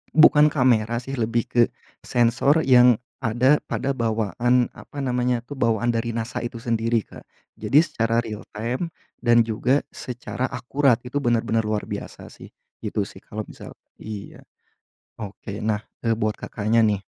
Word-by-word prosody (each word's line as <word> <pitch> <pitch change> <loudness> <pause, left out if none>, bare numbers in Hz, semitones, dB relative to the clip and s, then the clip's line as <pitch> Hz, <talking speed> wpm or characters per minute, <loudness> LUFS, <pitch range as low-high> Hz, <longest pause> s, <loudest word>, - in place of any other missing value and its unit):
Bukan 150 -1 +7
kamera 120 -5 +2
sih 135 - -6
lebih 115 +1 +1
ke, 120 -1 +4 0.4
sensor 120 +6 +2
yang 125 -2 +7 0.2
ada 130 +4 +3
pada 140 - -1
bawaan 120 +1 +1
apa 145 - -13
namanya 125 -1 0
tuh 135 +2 -9
bawaan 115 +1 +2
dari 115 0 -2
NASA 115 +1 -3
itu 120 0 -5
sendiri 115 -1 0
Kak, - - -14 0.3
jadi 150 +4 +4
secara 115 -5 0
realtime 115 +7 -4 0.3
dan 120 -1 +4
juga 120 +5 +1
secara 125 +1 -4
akurat 130 +1 +1
itu 130 +3 -2
benar-benar 115 -3 +1
luar 105 -1 -1
biasa - - -7
sih, - - -12 0.3
gitu - - -2
sih - - -11
kalau - - -6
misal - - -12 0.2
iya, 105 -2 -8 0.8
oke 105 -1 -7
nah, 105 -1 0 0.2
e 115 - +3
buat 110 -1 -1
Kakaknya, 110 +1 +1
nih. 100 -2 +1
120 Hz, 145 wpm, -23 LUFS, 110-125 Hz, 0.8 s, Bukan